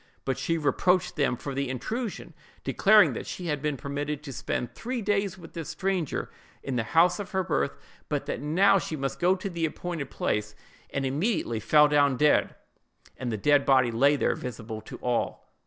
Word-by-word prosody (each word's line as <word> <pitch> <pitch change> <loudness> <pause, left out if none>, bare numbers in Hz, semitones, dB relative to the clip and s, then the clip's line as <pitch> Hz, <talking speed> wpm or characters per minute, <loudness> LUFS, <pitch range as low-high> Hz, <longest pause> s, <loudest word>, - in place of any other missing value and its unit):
But 135 -1 -1
she 165 - 0
reproached 180 +4 +1
them 140 -5 +1
for 140 - -5
the 140 0 -2
intrusion, 220 - -4 0.3
declaring 210 +1 +5
that - - -6
she 180 - -6
had 150 -4 -1
been 150 -1 -1
permitted 145 +2 -4
to 140 -3 -7
spend 120 0 -3
three 250 +1 -4
days 200 -3 0
with 165 -3 -13
this 165 -3 -6
stranger, 190 -5 -2 0.3
in 135 - -3
the 120 - +1 0.2
house 175 +5 +5
of 205 0 -6
her 190 0 +1
birth; 70 - -1 0.3
but - - -1
that - - -4
now 185 +7 +4
she 160 - -4
must 135 -2 -3
go 180 +2 +4
to 190 +1 -5
the 170 -3 -4
appointed 160 -2 -3
place; 105 0 -2 0.3
and 140 -1 -2
immediately 145 - 0
fell 150 +6 +5
down 145 -3 +3
dead, 150 +2 +3 0.6
and 125 -2 -4
the 110 - -2
dead 145 +6 +4
body 130 -3 +4
lay 140 +6 +4
there 140 - +1
visible 110 -3 -6
to - - -9
all. 125 -1 -2
150 Hz, 190 wpm, -27 LUFS, 130-180 Hz, 0.6 s, declaring